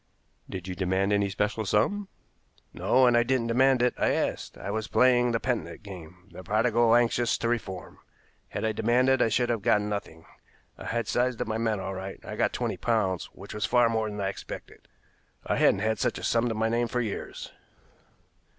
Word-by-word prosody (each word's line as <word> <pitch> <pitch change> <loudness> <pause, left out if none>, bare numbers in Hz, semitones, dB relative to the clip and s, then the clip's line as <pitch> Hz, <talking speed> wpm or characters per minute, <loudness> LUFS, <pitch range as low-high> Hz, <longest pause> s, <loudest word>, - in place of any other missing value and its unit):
"Did 95 0 -6
you 90 - -3
demand 95 +2 0
any 100 -1 +2
special 105 +3 -1
sum?" 115 - +1 0.7
"No; 130 0 +3
and 120 -1 +4
I 120 - +5
didn't 125 0 +1
demand 125 +2 +3
it, 125 - +2
I - - +2
asked. - - -2
I 100 - -5
was 110 0 -2
playing 125 -1 +4
the 115 - 0
penitent 120 -3 -3
game, 90 -2 -11
the 95 - -10
prodigal 115 +2 +3
anxious 120 -1 +2
to 115 - -2
reform. 100 -7 -4 0.5
Had - - -3
I 110 - +1
demanded 125 +4 +2
I - - +3
should 120 +2 +1
have 115 -3 0
got 105 - +3
nothing. 100 -6 -5 0.5
I - - -11
had 115 -2 -2
sized 125 -1 0
up - - -2
my 110 0 -2
men 110 -3 0
all 95 0 -4
right. 95 +1 -6
I - - -6
got - - +1
twenty - - -2
pounds, 105 -6 0
which - - -11
was 105 -1 -1
far 120 -1 +4
more 110 -1 0
than 105 0 -6
I 95 -1 0
expected. 95 - -9 0.6
I - - 0
hadn't 95 - +3
had 110 +1 0
such - - 0
a - - -8
sum 120 +1 +1
to 115 - -2
my 110 +1 +1
name 120 +1 +1
for 125 - -2
years." 110 -4 -5
110 Hz, 205 wpm, -27 LUFS, 100-120 Hz, 0.7 s, I